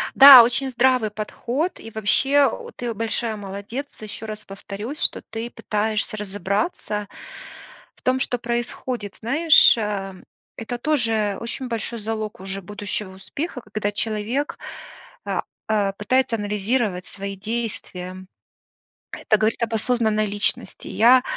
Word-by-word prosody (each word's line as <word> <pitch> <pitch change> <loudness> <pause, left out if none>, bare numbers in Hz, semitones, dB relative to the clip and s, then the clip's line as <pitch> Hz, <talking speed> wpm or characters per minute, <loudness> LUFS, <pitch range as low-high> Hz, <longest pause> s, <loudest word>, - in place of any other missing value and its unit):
Да, 270 -3 +12
очень 245 +3 +1
здравый 250 -3 +2
подход, 240 - -3
и 225 - -10
вообще, 270 +6 +3 0.3
ты 240 -1 -3
большая 225 +1 -2
молодец, 205 +8 -7
ещё 215 +1 -7
раз 215 -1 -7
повторюсь, 205 +7 -7
что - - +1
ты 225 +1 -6
пытаешься 215 0 -2
разобраться 205 - -2 0.9
в - - -24
том, 255 +1 +2
что 250 -1 0
происходит. 240 -2 -3
Знаешь, 290 +5 +6
а, 200 -3 -3 0.4
это 240 +2 -4
тоже 225 -7 0
очень 245 +3 -4
большой 230 0 -2
залог 215 -1 -4
уже 195 +1 -4
будущего 205 0 -4
успеха, 265 - -5
когда 205 -1 -1
человек, 220 +6 -2 0.7
а - - -1 0.3
а, 205 -2 +2
пытается 235 +4 +1
анализировать 205 -1 -1
свои 200 +1 -6
действия. 190 -4 -5 0.9
Это 215 - +1
говорит 220 +2 0
об 230 - -1
осознанной 220 -2 +1
личности. 205 0 -1
Я 250 +3 +5
220 Hz, 125 wpm, -23 LUFS, 205-245 Hz, 0.9 s, Да